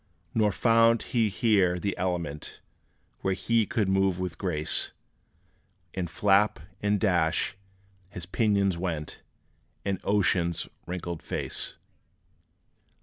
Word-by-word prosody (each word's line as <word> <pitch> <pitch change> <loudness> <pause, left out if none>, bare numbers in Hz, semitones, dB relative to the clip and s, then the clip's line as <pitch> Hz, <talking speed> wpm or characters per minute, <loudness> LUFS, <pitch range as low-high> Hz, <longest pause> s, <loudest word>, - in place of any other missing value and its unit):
Nor 105 -2 +3
found 115 +1 +4
he 115 -3 +1
here 95 -3 +2
the 100 +3 -2
element 85 -5 -3 0.6
Where 95 -1 0
he 115 +1 +1
could 110 -5 0
move 95 -1 +2
with 90 -1 -4
grace; 80 -6 +1 1.0
And 90 -3 -3
flap, 100 +3 +3 0.2
and 105 0 +1
dash, 85 -6 +1 0.5
his 90 -4 -6
pinions 100 -2 +1
went, 85 -4 -4 0.6
In 100 -2 -1
ocean's 90 -4 +1 0.2
wrinkled 85 -2 -4
face. - - -3
95 Hz, 105 wpm, -28 LUFS, 90-105 Hz, 1.0 s, found